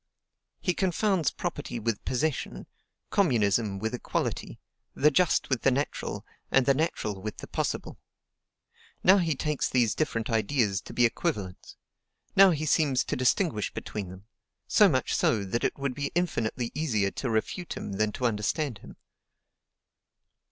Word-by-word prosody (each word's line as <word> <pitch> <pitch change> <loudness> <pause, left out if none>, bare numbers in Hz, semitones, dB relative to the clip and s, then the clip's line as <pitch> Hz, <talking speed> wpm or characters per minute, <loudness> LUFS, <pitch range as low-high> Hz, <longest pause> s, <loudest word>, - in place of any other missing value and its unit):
He 180 - +1
confounds 190 -3 +1
property 120 - -4
with 115 -2 -2
possession, 140 +3 -2 0.5
communism 110 - +2
with 110 +4 -3
equality, 125 - -3 0.4
the 150 +2 +4
just 175 +4 +2
with 130 -4 0
the - - +4
natural, 135 +3 -2 0.2
and 135 -1 +4
the 140 - +5
natural 110 - -2
with 110 +1 -5
the - - -7
possible. - - -3 1.0
Now 190 +2 +7
he 165 -4 +1
takes 150 +1 -1
these 120 -4 +2
different 115 -8 -1
ideas 110 -4 +1
to - - -9
be 120 - +4
equivalents; 105 - -3 0.6
now 195 0 +8
he 155 -3 0
seems 145 -4 +2
to - - -3
distinguish 130 - +1
between 100 -4 -5
them, 95 +2 -12 0.4
so - - +6
much - - 0
so 110 -3 +2
that 100 +5 -2
it - - 0
would 140 -2 -2
be 140 +1 -3
infinitely 125 -9 -1
easier 110 -10 0
to 130 - -3
refute 115 +10 -2
him - - -5
than 105 +2 0
to 125 - -3
understand 115 +3 -1
him. - - -13
125 Hz, 150 wpm, -28 LUFS, 110-155 Hz, 1.0 s, now